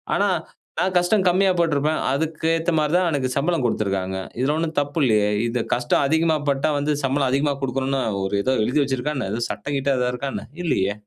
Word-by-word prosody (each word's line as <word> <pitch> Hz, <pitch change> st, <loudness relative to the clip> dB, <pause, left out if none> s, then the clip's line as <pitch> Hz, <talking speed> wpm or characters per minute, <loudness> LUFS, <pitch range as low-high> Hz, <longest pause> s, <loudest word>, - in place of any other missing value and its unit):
ஆனா 205 Hz, -, +2 dB, 0.5 s
நான் 185 Hz, +2 st, +1 dB
கஷ்டம் 185 Hz, +2 st, +2 dB
கம்மியா 190 Hz, +2 st, +3 dB
பட்டுருப்பேன். 155 Hz, -2 st, +1 dB
அதுக்கு 160 Hz, +3 st, -2 dB
ஏத்த 165 Hz, +2 st, -1 dB
மாரி 150 Hz, -1 st, +1 dB
தான் 180 Hz, -1 st, +2 dB
எனக்கு 135 Hz, -3 st, -1 dB
சம்பளம் 160 Hz, 0 st, +1 dB
குடுத்துருக்காங்க. 95 Hz, -4 st, -1 dB, 0.2 s
இதுல 135 Hz, +4 st, +1 dB
ஒன்னும் 160 Hz, 0 st, -3 dB
தப்பு 145 Hz, +3 st, -3 dB
இல்லையே, 105 Hz, -3 st, +3 dB, 0.2 s
இது 120 Hz, 0 st, -1 dB
கஷ்டம் 120 Hz, +3 st, +1 dB
அதிகமா 160 Hz, +1 st, +2 dB
பட்டா 140 Hz, +2 st, +1 dB
வந்து 145 Hz, +1 st, 0 dB
சம்பளம் 135 Hz, 0 st, +1 dB
அதிகமா 140 Hz, +2 st, +1 dB
குடுக்கணும்னு 135 Hz, +1 st, -1 dB, 0.2 s
ஒரு 100 Hz, +1 st, -2 dB
இதோ 130 Hz, -, +1 dB
எழுதி 130 Hz, +7 st, +1 dB
வைச்சிருக்கா 135 Hz, +2 st, -2 dB
என்ன? 125 Hz, -, -3 dB
ஏதோ 120 Hz, -, -3 dB
சட்டம் 140 Hz, -, -4 dB
கிட்டம் 135 Hz, -1 st, 0 dB
ஏதாது 125 Hz, 0 st, 0 dB
இருக்கா 135 Hz, +3 st, -3 dB
என்ன? -, -, -5 dB, 0.2 s
இல்லையே 100 Hz, -, +1 dB
140 Hz, 195 wpm, -22 LUFS, 125-160 Hz, 0.5 s, கம்மியா